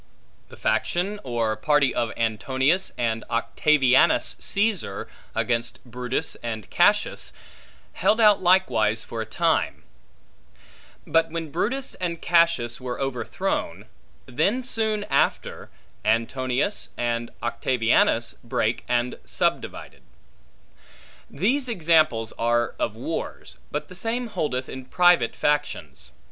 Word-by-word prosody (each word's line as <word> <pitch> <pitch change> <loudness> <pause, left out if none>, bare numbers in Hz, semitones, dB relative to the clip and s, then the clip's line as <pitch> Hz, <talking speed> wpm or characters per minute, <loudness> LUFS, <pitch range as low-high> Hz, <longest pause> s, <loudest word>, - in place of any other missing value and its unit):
The - - -13
faction 195 +4 0
or 115 -3 -1
party 145 +4 +2
of 115 -2 -1
Antonius 130 - +1
and 115 -2 -1
Octavianus 130 +3 +3
Caesar, 200 - -1 0.3
against 120 -1 -1
Brutus 125 +5 -2
and 110 -5 -5
Cassius, 205 +4 +2 0.6
held 220 - +2
out 210 -3 +6
likewise 125 - +3
for 115 - -5
a 110 - -5
time; - - 0 1.2
but 165 0 +2
when 165 -2 -5
Brutus 260 - -2
and 170 -2 -2
Cassius 165 -10 +2
were 125 -1 -4
overthrown, 130 -4 -3 0.4
then 180 - 0
soon 220 -4 -1
after, 140 -7 -1 0.3
Antonius 125 - 0
and 120 -1 -1
Octavianus 120 -1 +1
brake 115 -1 -1
and 120 0 0
subdivided. - - -2 1.3
These 250 - 0
examples 155 - +2
are 120 0 +1
of - - -1
wars, - - -5
but 150 - -4
the - - -12
same 230 +5 -3
holdeth 130 -10 -2
in 130 -1 -8
private 175 -5 +3
factions. 75 - -2
130 Hz, 105 wpm, -24 LUFS, 115-175 Hz, 1.3 s, out